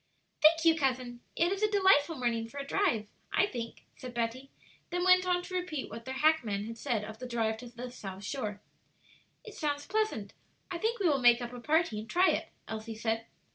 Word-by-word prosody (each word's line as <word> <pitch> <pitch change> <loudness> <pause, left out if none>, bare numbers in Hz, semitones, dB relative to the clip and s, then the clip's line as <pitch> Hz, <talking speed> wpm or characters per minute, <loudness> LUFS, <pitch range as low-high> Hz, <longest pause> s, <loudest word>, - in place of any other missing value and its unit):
"Thank 325 +2 +6
you, 325 -1 +7
cousin. 255 -5 -1 0.2
It 345 +2 +2
is 395 +1 -2
a 425 - +3
delightful 380 -7 +4
morning 235 -3 -1
for 280 - -12
a 275 - -4
drive, 280 - +1 0.2
I - - +4
think," 235 - -6
said 250 -1 -9
Betty; 240 +3 -2 0.4
then 355 +1 -1
went 365 0 +5
on 355 0 +2
to 370 - -9
repeat 355 -6 -3
what 230 - -8
their 260 0 -4
hackman 265 -9 +2
had 230 +1 -7
said 235 -7 -1
of 220 +1 -8
the 255 - -6
drive 225 -2 0
to 245 +2 -9
the 245 +1 -7
South 195 -4 -8
Shore. 210 -3 -4 0.8
"It 435 - -10
sounds 290 -3 -2
pleasant. 425 - -1 0.4
I 345 - -3
think 460 +4 0
we 385 - +3
will 280 -4 +2
make 240 -1 +7
up 240 0 -5
a 245 - -7
party 300 -4 +1
and 215 - -8
try 365 +2 +4
it," - - -2 0.2
Elsie 220 0 -5
said. 225 +1 -2
255 Hz, 215 wpm, -31 LUFS, 230-340 Hz, 0.8 s, you